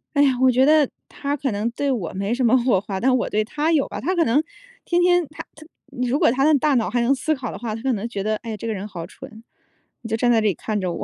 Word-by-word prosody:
哎 285 - +5
呀， 275 - +4
我 260 - +6
觉 260 +2 +4
得 305 -2 +4 0.2
它 285 0 -3
可 270 -3 -2
能 210 +3 -1
对 280 +3 -1
我 210 -10 -2
没 200 +3 -2
什 255 +1 -1
么 250 +3 +5
火 235 -7 +2
花， 200 -2 -5
但 255 +3 +3
我 245 - -1
对 215 +1 +1
它 300 +8 -1
有 300 -4 +2
吧。 - - -6
它 370 +1 -1
可 335 - +2
能 280 +7 +2 0.4
天 350 0 +1
天 355 -1 +3
它 305 - -9
它 310 0 -14 0.4
如 265 +4 +1
果 310 -8 +4
它 270 +2 0
的 290 - +5
大 295 +1 +1
脑 225 -7 +1
还 240 +4 0
能 245 +3 +3
思 310 +4 -1
考 255 -4 -5
的 - - -7
话， 225 -3 -4
它 225 - -7
可 265 -2 +1
能 215 +2 -3
觉 200 -4 -4
得， 215 +1 0
哎 230 - -9
呀， 215 - -4
这 230 - -8
个 225 - -1
人 200 +1 -5
好 170 -5 -7
蠢， 220 +1 -13 0.6
你 225 - -8
就 225 - 0
站 240 +1 +2
在 225 - +3
这 215 - +1
里 200 - +2
看 215 +4 -3
着 180 - -2
我。 - - -4
240 Hz, 330 characters per minute, -22 LUFS, 215-285 Hz, 0.6 s, 我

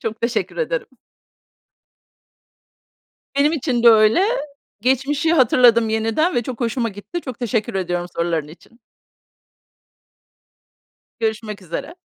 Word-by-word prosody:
Çok 220 0 -5
teşekkür 235 +1 -2
ederim. - - -2 2.5
Benim 290 +2 +3
için 260 -6 -1
de 240 - +8
öyle. 220 - +5 0.6
Geçmişi 275 +6 +1
hatırladım 240 -5 +5
yeniden 225 +10 0
ve 240 - +1
çok 245 0 -7
hoşuma 235 0 -1
gitti. 205 - -7
Çok 255 -7 -8
teşekkür 230 -2 -2
ediyorum 175 -2 -2
soruların 165 -3 -1
için. 225 +9 -17 2.4
Görüşmek 220 -2 -3
üzere. 170 - -6
230 Hz, 105 wpm, -20 LUFS, 215-265 Hz, 2.5 s, de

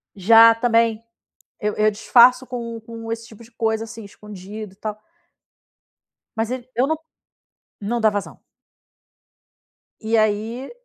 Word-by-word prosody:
Já, 225 +4 +7
também. 230 -1 +1 0.6
Eu 210 -1 -1
eu 215 0 +2
disfarço 245 +4 +4
com 235 -2 -6
com 225 0 -9
esse 230 0 -5
tipo 225 0 -15
de 230 - -17
coisa, 225 -1 -2
assim, 225 0 -10
escondido, 205 0 -10
e - - -32
tal. 215 0 -6 1.4
Mas 225 +1 -1
ele 255 -1 -5
eu 250 +3 +2
não 315 +2 0 0.8
não 235 +4 -2
dá 220 -1 +4
vazão. 205 -1 -6 1.6
E 225 +1 0
aí, 220 +4 -1
225 Hz, 135 wpm, -21 LUFS, 215-235 Hz, 1.6 s, Já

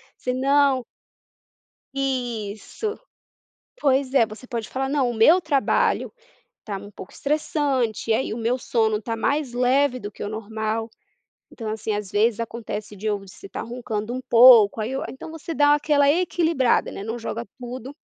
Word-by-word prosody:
Senão 265 0 +2 1.1
isso. 250 - -3 0.8
Pois 270 -1 +2
é, 235 -4 +5
você 215 +4 -11
pode 230 -4 -4
falar 265 +1 -2
não, 270 -3 +1
o - - -4
meu 310 +12 +6
trabalho 295 -5 +1 0.5
tá 205 -3 -4
um 205 +1 -9
pouco 185 - -11
estressante, 275 -7 0
aí 220 +1 0
o 225 - -4
meu 235 +3 0
sono 220 -3 0
tá 230 0 -3
mais 280 +3 -1
leve 255 +2 +2
do 205 -3 -7
que - - -10
o 205 - -3
normal. 220 +1 -3 0.6
Então 225 -3 -6
assim 220 0 -3
às 205 -2 -4
vezes 215 +2 +2
acontece 220 -2 -5
de 210 +3 -5 0.3
estar 195 - -7
roncando 230 -2 -4
um 255 - -4
pouco, 230 -3 +7
aí 220 - -3
eu 270 - -2
então 265 - -9
você 325 +1 -6
dá 290 0 +5
aquela 290 -1 +3
equilibrada, 330 -6 +1
né, - - -7
não 225 +3 -4
joga 235 0 -4
tudo 250 +2 -7
245 Hz, 155 wpm, -23 LUFS, 220-275 Hz, 1.1 s, pouco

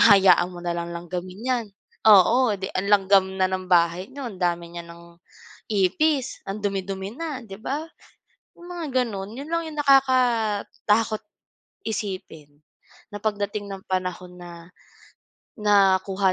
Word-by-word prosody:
Hahayaan 190 -3 +6
mo 175 - -9
na 175 - 0
lang 170 0 -4
langgamin 180 +3 -6
'yan, 245 -3 0 0.4
oo, 220 +4 +6
'di 190 - -4
ang 185 - -1
langgam 195 -1 +5
na 190 -1 +3
ng 185 0 -3
bahay 175 +2 +3
niyo, 280 0 -7
ang 200 - -10
dami 170 -1 -1
niya 170 0 -6
ng 170 0 -13 0.7
ipis, 245 - +1
ang 200 - -4
dumi-dumi 195 0 -3
na, 310 -5 -4
'di 195 -2 -9
ba? 280 +5 -2 0.8
'Yong 345 0 -13
mga 345 -2 -5 0.2
gano'n, 200 -4 -5
'yon 285 +2 -7
lang 335 0 +1
'yong 300 -1 -8
nakakatakot 230 -5 +2 0.6
isipin, 185 -9 -5 0.5
na 205 - -6
pagdating 205 -1 -2
ng 195 -1 -7
panahon 180 -1 -3
na, 170 -1 -11 0.9
nakuha 195 -2 +3
195 Hz, 140 wpm, -24 LUFS, 185-225 Hz, 0.9 s, Hahayaan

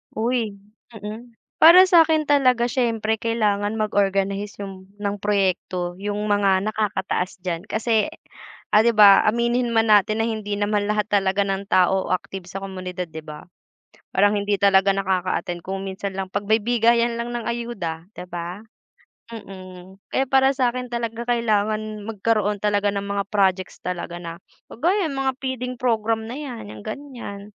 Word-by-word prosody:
Uy! 225 -2 -1 0.4
Mm, 220 +3 -9 0.2
para 345 +3 +9
sa'kin 325 -4 +4
talaga 255 -5 +3
siyempre 225 -3 0
kailangan 210 -2 0
mag-organize 200 -1 0
'yung 190 -1 -9
ng 205 -1 -3
proyekto 185 -3 -1
'yung 205 0 -3 0.2
mga 195 -2 +3
nakakataas 190 -3 -2
diyan. 175 +2 -4
Kasi, 220 +2 +1 0.6
ah, 210 - +5
'di 230 +1 +4
ba, 205 -1 +7
aminin 235 +1 +1
man 225 -1 +3
natin 215 +2 +4
na - - 0
hindi 210 -2 -3
naman 205 0 0
lahat 210 0 -1
talaga 195 0 +2
ng 195 0 -2
tao 190 0 +2
o 185 - +1
active 185 0 -6
sa 195 +1 -7
komunidad 185 -3 -6
'di 160 0 -9
ba? 150 0 -9 0.7
Parang 205 +1 +4
hindi 205 0 0
talaga 195 0 +4
nakaka-attend, 185 -2 -1
kung 190 +2 -5
minsan 195 0 -5
lang 190 -1 -4
pagbigayan 230 +3 +2
lang 240 +1 -4
ng 235 - -3
ayuda 195 -9 -5
'di 180 - -7
ba? 175 +4 -6 0.7
Mm, 185 -3 -11 0.2
kaya 265 -1 0
para 270 0 +4
sa'kin 250 -1 -1
talaga 235 0 -3
kailangan 215 -2 -1
magkaroon 210 -1 0
talaga 205 -1 +1
ng 200 - -2
mga 200 0 -2
projects 190 -2 +1
talaga 175 -1 -5
na 165 0 -7 0.3
kagaya 345 - 0
'yung 275 - -5
mga 265 -1 0
feeding 255 -1 -4
program 225 -2 0
na 255 - -6
'yan, 250 - -7
'yang 105 -1 -11
ganiyan, 245 -8 -7
210 Hz, 150 wpm, -22 LUFS, 195-235 Hz, 0.7 s, para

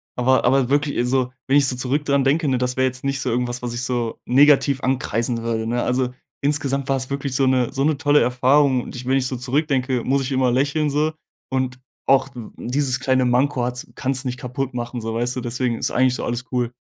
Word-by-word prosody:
aber 130 +1 +2
aber 130 0 +3
wirklich 145 -3 +1
so 130 -1 0 0.2
wenn 140 +2 +4
ich 140 -2 +4
so 130 - +1
zurück 135 +4 -1
dran 140 -1 +2
denke, 145 +3 +2
ne, 130 -2 +2
das 125 0 -2
wäre 130 - +3
jetzt 130 0 -4
nicht 140 0 -1
so 130 - -2
irgendwas, 120 +1 -1
was 120 -1 -4
ich 120 - -3
so 120 -2 -2
negativ 140 +1 +4
ankreiden 120 -2 -1
würde, 115 -1 -2
ne? 120 +1 0
Also, 125 0 0 0.3
insgesamt 140 -2 0
war 135 - +3
es 130 +1 -5
wirklich 140 -1 -3
so 135 - +3
'ne 130 -2 +2
so 135 0 -1
'ne 150 -1 +2
tolle 145 +1 +3
Erfahrung 130 +1 +3
und - - -9
ich 125 0 -7
wenn 135 +1 +2
ich 130 - 0
so 130 - -3
zurückdenke, 130 -1 0
muss 135 +1 +1
ich 135 +1 -4
immer 130 -1 +2
lächeln 145 +4 +1
so. 150 +2 +1 0.4
Und 130 -1 -2 0.3
auch 135 0 +4
w 120 -3 -8
dieses 130 0 -1
kleine 130 -1 +2
Manko 125 +1 +1
hat's 125 0 -4
kann's 130 +1 -1
nicht 125 0 -3
kaputtmachen 125 -2 -4
so, 110 0 -4
weißt 120 +2 -1
du? 125 - -3
Deswegen 120 0 -2
ist - - -1
eigentlich 130 0 +2
so - - -4
alles 120 +1 -3
cool. 125 -2 -1
130 Hz, 230 wpm, -21 LUFS, 125-140 Hz, 0.4 s, wenn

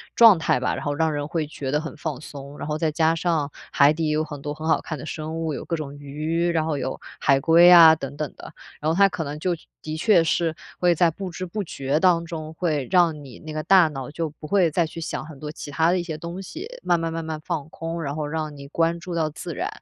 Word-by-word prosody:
状 225 -6 +8
态 160 - +1
吧， 125 - 0
然 - - -6
后 145 - 0
让 160 +1 +1
人 145 -1 -3
会 155 -1 -1
觉 135 -3 -5
得 150 +1 +1
很 160 -1 -7
放 150 -3 -4
松。 140 -1 -10
然 - - -5
后 150 0 -1
再 160 0 +1
加 160 +1 +2
上 160 -4 0 0.2
海 140 0 +5
底 160 0 -1
也 150 - +1
有 155 +1 +1
很 150 -2 -7
多 145 - -3
很 155 +1 -6
好 160 - +3
看 155 - -6
的 - - -7
生 160 +1 -5
物， 160 -2 -2
有 - - -6
各 170 - -1
种 145 -3 -6
鱼， 155 +4 -1
然 165 -2 +1
后 155 -2 -1
有 130 - -3 0.2
海 135 -1 +3
龟 165 +4 +7
啊 165 -2 +10
等 140 -2 -7
等 150 0 -4
的， - - -11 0.3
然 155 +2 0
后 165 - 0
它 200 0 +6
可 185 -3 -4
能 145 +1 -6
就 175 +2 0 0.3
的 155 0 -5
确 180 -2 +4
是 165 0 0 0.2
会 175 -1 +4
在 170 +1 +3
不 190 +3 -6
知 185 +2 -5
不 210 +4 -3
觉 140 -3 -1
当 170 -2 +4
中， 160 -1 -6
会 155 -5 -1
让 170 -5 +3
你 125 -4 -12
那 155 - -9
个 155 0 -3
大 185 -2 +6
脑 135 -2 -6
就 165 0 -3
不 150 +1 -11
会 185 -3 +3
再 170 +2 +1
去 165 +1 -8
想 160 - -4
很 155 -3 -11
多 150 +1 -6
其 150 -2 -8
它 160 +3 +2
的 185 - +2
一 - - -2
些 165 -2 -5
东 170 +3 -6
西， 330 - -7 0.2
慢 170 - +2
慢 165 0 -2
慢 165 0 -4
慢 160 -1 -4
放 155 -3 -3
空， 165 +1 -5
然 140 -1 -3
后 150 -1 -3
让 155 -1 -4
你 140 -1 -10
关 165 +3 0
注 175 +1 -6
到 160 -2 +1
自 - - -7
然， - - -2
160 Hz, 295 characters per minute, -24 LUFS, 150-170 Hz, 0.3 s, 啊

